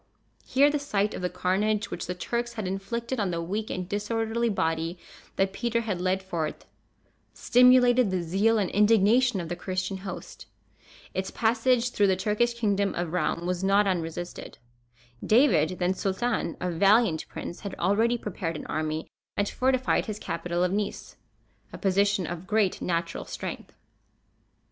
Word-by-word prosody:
Here 280 +2 +4
the 295 - 0
sight 210 -7 0
of - - -5
the 180 - -1
carnage 195 +4 0
which 170 - -4
the 180 - -3
Turks 235 +6 -3
had 215 -5 -4
inflicted 235 +6 -3
on 200 -3 0
the 170 -1 -2
weak 200 +6 -3
and 180 -1 -4
disorderly 225 +3 -1
body 165 -3 -1 0.4
that 195 0 +1
Peter 235 +2 -1
had 200 -6 -3
led 185 +1 0
forth, 165 -5 -4 0.7
stimulated 250 -1 +5
the 185 -2 -1
zeal 200 +7 +2
and 195 -4 0
indignation 220 +2 +4
of 170 - -4
the 175 - -3
Christian 185 +2 -3
host. 190 0 -8 0.7
Its 190 0 -2
passage 240 +2 +1
through 205 -3 +3
the 190 - +3
Turkish 210 +5 0
kingdom 200 -3 0
of 175 -1 -3
Roum 175 -1 -1
was 180 +1 -2
not 200 +2 +4
unresisted. 175 -2 -4 0.7
David, 185 - +3
then 180 +1 +1
Sultan, 195 -1 -1
a 180 0 -2
valiant 195 0 +3
prince, 175 - -7
had 200 -2 -6
already 225 +5 +2
prepared 180 -6 -4
an - - -6
army, 155 0 -3 0.3
and 205 - +1
fortified 255 +2 +1
his 215 -1 -4
capital 175 -3 -2
of 180 - +1
Nice, 205 +1 -3 0.6
a - - -8
position 200 0 +2
of 175 +2 -6
great 210 -3 +1
natural 170 -1 -2
strength. - - -6
200 Hz, 160 wpm, -27 LUFS, 180-225 Hz, 0.7 s, stimulated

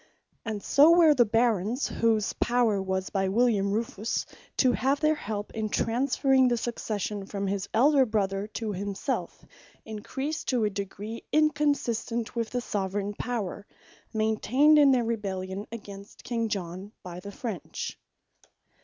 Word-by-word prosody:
And 215 -3 -4
so 315 +5 +6
were 325 -3 +7
the 245 -4 +4
Barons, 225 +1 +1
whose 220 -3 +1
power 235 -5 +2
was 190 0 -2
by 195 -1 0
William 210 -2 +2
Rufus 220 0 -2 0.3
(to 255 - +4
have 270 +3 +1
their 305 0 +3
help 210 -8 -5
in 220 -1 -2
transferring 260 +3 +2
the 240 -1 +2
Succession 210 -4 -3
from 200 -1 -3
his 195 0 -2
Elder 275 +4 +5
brother, 200 -2 -1
to 220 0 -4
himselfe,) 200 +1 -4 0.4
encreased 270 +8 -4
to 245 -4 +1
a 210 - +1
degree, 200 +3 -6
inconsistent 285 -7 +1
with 230 -1 -1
the 245 - -2
Soveraign 200 -2 -2
Power, 205 -3 -4 0.4
maintained 235 +7 +3
in 285 -1 +7
their 250 -3 +3
Rebellion 195 -3 -3
against 200 -3 -10
King 230 -2 -1
John, 190 +1 -5
by 180 -1 -7
the 200 +2 -8
French. 210 - -5
220 Hz, 140 wpm, -27 LUFS, 200-245 Hz, 0.4 s, were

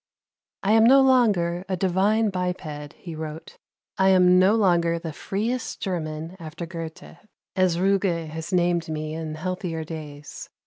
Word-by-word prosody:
"I 200 - +2
am 220 0 +6
no 265 +4 +7
longer 205 -10 +3
a 185 - -1
divine 200 +4 +2
biped," 165 -5 -4
he 170 - -9
wrote. 155 0 -8 0.4
"I 190 0 +5
am 180 -1 +5
no 190 +4 +5
longer 170 -5 +2
the 165 -2 -6
freest 225 - -3
German 165 -3 -4
after 165 +1 -7
Goethe, 165 -1 -8 0.4
as 185 -3 +2
Ruge 170 -4 -1
named 175 -2 +1
me 155 0 -4
in 160 -1 -5
healthier 175 -1 -4
days. 150 -2 -9
175 Hz, 140 wpm, -24 LUFS, 160-190 Hz, 0.4 s, no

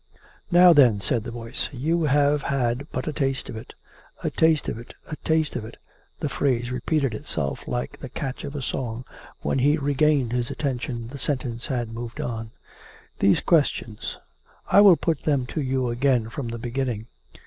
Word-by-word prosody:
" - - -29
Now, 175 0 +8
then," 125 -9 +6
said 115 +2 0
the - - -4
voice, 115 -1 -4
" - - -22
you 155 +5 0
have 145 0 +3
had 135 0 -1
but - - -3
a 155 - -1
taste 135 -3 -1
of - - -6
it... 110 - -9
." - - -25
(" - - -24
A - - 0
taste 160 -2 +3
of 110 - -3
it; 120 - -11
a 155 - -5
taste 160 -2 0
of - - -2
it." 110 +2 -10 0.4
The - - 0
phrase 120 -3 0
repeated 135 +1 0
itself 75 - -3
like - - -3
the - - -7
catch 135 -1 -5
of 140 - -6
a 140 - -3
song.... 125 -1 -3 0.4
When - - 0
he 145 +4 +4
re 145 -1 0
gained 140 -4 +3
his 120 -1 -1
attention, 125 -4 -3
the 140 +2 -8
sentence 125 -5 -2
had 120 -5 -2
moved 115 0 -6
on.) 115 -2 -3 0.4
"... - - -23
these 100 - +4
questions. 140 -9 0 0.5
I 200 - +8
will 195 -5 +8
put 165 -4 -1
them 140 -4 +1
to 155 - -2
you 130 -2 0
again 120 -2 +1
from 125 +1 -5
the 115 0 -4
beginning. 120 -2 -2
130 Hz, 205 wpm, -25 LUFS, 120-145 Hz, 0.5 s, Now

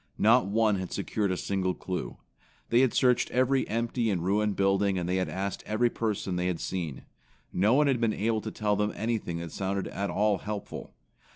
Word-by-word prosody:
Not 115 +1 +5
one 105 0 +2
had 95 -1 -5
secured 100 0 -1
a 90 - -1
single 95 -1 -1
clue. 90 -10 -5 0.5
They 120 - +4
had 130 -2 +4
searched 125 -2 +3
every 130 +1 +2
empty 115 +1 -1
and 90 -5 0
ruined 105 +1 +1
building 95 0 +2
and 90 -1 -2
had 90 +1 0
asked 100 +1 -3
every 115 +3 +2
person 105 -5 -2
that - - -1
they 90 - 0
had 90 -3 -1
seen. 85 -8 -4 0.5
No 105 +7 +3
one 150 +2 +4
had 135 -4 +1
been 115 -2 +3
able 110 +1 0
to 110 - -4
tell 105 -1 0
them 105 +1 0
anything 110 -7 -2
that 85 -1 -6
sounded 95 0 -2
at 100 0 -3
all 105 -1 +2
helpful. 105 -1 -6
105 Hz, 200 wpm, -28 LUFS, 95-115 Hz, 0.5 s, Not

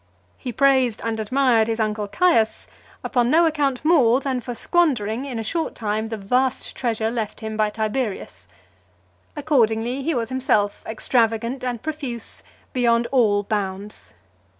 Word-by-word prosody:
He 250 - -5
praised 260 -3 +3
and 225 -1 -2
admired 235 0 +2
his 225 0 -2
uncle 210 -1 -1
Caius, 230 - +2 0.4
upon 245 -2 +1
no 330 +5 +5
account 290 -4 0
more, 265 -7 +4
than 265 -2 -2
for 245 0 -6
squandering 255 - +1
in 260 -4 -5
a 225 - -3
short 325 +9 -2
time 220 0 -2
the 225 - -4
vast 250 +6 -1
treasure 225 -3 -1
left 225 -2 -4
him 220 0 -5
by 215 -1 +1
Tiberius. 220 0 -4 0.9
Accordingly, 250 -4 +1
he 310 +2 -1
was 230 -2 -2
himself 245 -6 0
extravagant 230 +2 0
and 245 -3 -3
profuse, 285 -7 -4 0.3
beyond 235 -2 +2
all 215 -6 +3
bounds. 200 -1 -5
235 Hz, 145 wpm, -22 LUFS, 220-265 Hz, 0.9 s, no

